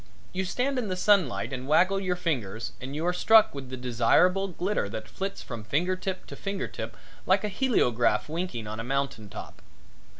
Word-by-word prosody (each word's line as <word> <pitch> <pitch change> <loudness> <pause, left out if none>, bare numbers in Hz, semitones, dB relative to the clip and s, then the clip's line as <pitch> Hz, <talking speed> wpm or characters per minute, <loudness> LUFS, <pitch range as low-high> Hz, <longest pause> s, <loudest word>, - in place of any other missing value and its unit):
You 190 +1 -1
stand 255 +7 0
in 230 - -2
the 185 - -1
sunlight 180 - +2
and 130 0 -5
waggle 185 +6 +4
your 185 -2 0
fingers 120 - -2
and 135 +3 -6
you 160 +3 -2
are 180 - +2
struck 220 +4 +6
with 135 -2 -7
the 130 - -5
desirable 125 +11 +3
glitter 185 - -1
that 110 +1 -6
flits 195 +1 -5
from 115 -4 -7
finger 165 - +1
tip 185 0 -4
to - - -9
finger 195 -1 -3
tip - - -7 0.3
like - - +4
a 210 - 0
heleograph 125 - +2
winking 160 -8 -3
on 110 +1 -5
a - - -3
mountain 135 -4 -2
top. - - -9
165 Hz, 195 wpm, -28 LUFS, 120-190 Hz, 0.3 s, struck